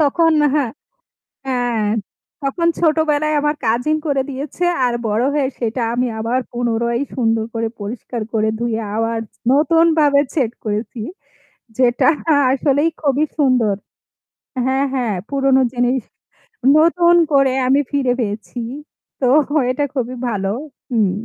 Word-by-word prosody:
তখন 325 Hz, +3 st, +3 dB, 0.2 s
হ্যাঁ, 280 Hz, -6 st, +1 dB, 0.8 s
হ্যাঁ 245 Hz, -4 st, 0 dB, 0.6 s
তখন 280 Hz, +5 st, -1 dB
ছোটবেলায় 305 Hz, -2 st, +2 dB
আমার 295 Hz, +1 st, +1 dB
কাজিন 245 Hz, +8 st, +1 dB
করে 275 Hz, -3 st, +1 dB
দিয়েছে 280 Hz, +6 st, -4 dB, 0.2 s
আর 245 Hz, -1 st, +1 dB
বড় 215 Hz, +2 st, +1 dB
হয়ে 285 Hz, -3 st, +1 dB
সেটা 235 Hz, +1 st, -2 dB
আমি 250 Hz, +1 st, +1 dB
আবার 230 Hz, +3 st, 0 dB
পুনরায় 235 Hz, 0 st, -1 dB
সুন্দর 225 Hz, -3 st, +1 dB
করে 230 Hz, 0 st, -1 dB
পরিষ্কার 225 Hz, +2 st, -5 dB
করে 220 Hz, -1 st, +1 dB
ধুয়ে 230 Hz, -1 st, -1 dB, 0.2 s
আবার 225 Hz, 0 st, 0 dB, 0.3 s
নতুনভাবে 310 Hz, -1 st, +4 dB
সেট 255 Hz, -7 st, 0 dB
করেছি। 215 Hz, +2 st, -3 dB, 0.8 s
যেটা 245 Hz, -1 st, +3 dB, 0.3 s
আ -, -, +4 dB, 0.2 s
আসলেই 285 Hz, +3 st, +2 dB
খুবই 285 Hz, 0 st, +2 dB
সুন্দর 250 Hz, -7 st, +3 dB, 0.9 s
হ্যাঁ, 265 Hz, +1 st, +1 dB
হ্যাঁ 240 Hz, -6 st, -1 dB
পুরোনো 275 Hz, -1 st, +3 dB
জিনিস 245 Hz, +1 st, +1 dB, 0.8 s
নতুন 340 Hz, +2 st, +4 dB, 0.2 s
করে 275 Hz, -2 st, +4 dB
আমি 275 Hz, +3 st, +4 dB
ফিরে 270 Hz, -4 st, +1 dB
পেয়েছি। 220 Hz, +3 st, -4 dB, 0.6 s
তো 255 Hz, -, +2 dB, 0.4 s
এটা 280 Hz, +3 st, -1 dB
খুবই 255 Hz, -1 st, -2 dB
ভালো 195 Hz, -3 st, -2 dB, 0.4 s
হুম 215 Hz, -6 st, +2 dB
255 Hz, 125 wpm, -19 LUFS, 230-290 Hz, 0.9 s, নতুনভাবে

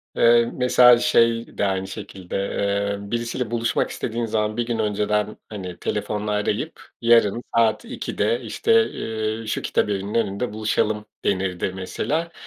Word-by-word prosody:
Eee, 120 Hz, 0 st, +5 dB
mesela 125 Hz, -1 st, +6 dB
şey 115 Hz, -1 st, +2 dB
de -, -, +1 dB
aynı 95 Hz, -1 st, -1 dB
şekilde, 95 Hz, -3 st, -8 dB
eee, 100 Hz, +1 st, -1 dB
birisiyle 120 Hz, 0 st, -2 dB
buluşmak 115 Hz, -1 st, 0 dB
istediğin 115 Hz, 0 st, -3 dB
zaman 110 Hz, 0 st, -1 dB
bir 120 Hz, -, 0 dB
gün 120 Hz, -1 st, -2 dB
önceden, 105 Hz, 0 st, 0 dB
hani, 95 Hz, -4 st, -7 dB
telefonla 105 Hz, 0 st, -2 dB
arayıp 105 Hz, 0 st, -2 dB, 0.2 s
"Yarın 115 Hz, -1 st, +4 dB
saat 115 Hz, -, +3 dB
2'de 460 Hz, -, -1 dB
işte, 455 Hz, -, -2 dB, 0.7 s
ııı, 115 Hz, -, -8 dB
şu -, -, -1 dB
kitabevinin 100 Hz, 0 st, -1 dB
önünde 110 Hz, 0 st, -1 dB
buluşalım" 105 Hz, 0 st, 0 dB, 0.2 s
denirdi 95 Hz, -2 st, 0 dB
mesela. 155 Hz, -, -2 dB
110 Hz, 135 wpm, -23 LUFS, 100-115 Hz, 0.7 s, mesela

